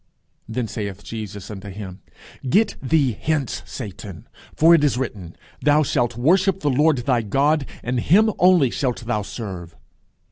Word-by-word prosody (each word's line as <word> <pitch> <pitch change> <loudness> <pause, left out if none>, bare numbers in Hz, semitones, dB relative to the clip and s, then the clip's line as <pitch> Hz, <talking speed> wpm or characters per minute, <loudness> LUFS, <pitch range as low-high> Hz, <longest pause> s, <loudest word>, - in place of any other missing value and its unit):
Then 115 +1 -2
saith 105 -2 -6
Jesus 105 -3 -7
unto 100 0 -8
him, 95 -1 -8 0.5
Get 210 - +3
thee 140 -1 +2
hence, 145 -5 -1
Satan; 100 -6 -8 0.3
for 165 +2 +6
it 165 -3 +4
is 140 -4 +2
written, 100 -9 -5 0.3
Thou 150 +1 +4
shalt 120 -4 0
worship 185 +8 +2
the 145 - +1
Lord 150 +3 +3
thy 125 -4 +2
God, 140 +6 +1 0.2
and 125 +1 -1
him 210 - +4
only 175 -8 +5
shalt 125 -4 -2
thou 115 -3 -1
serve. 95 -6 -7
125 Hz, 150 wpm, -22 LUFS, 105-150 Hz, 0.5 s, for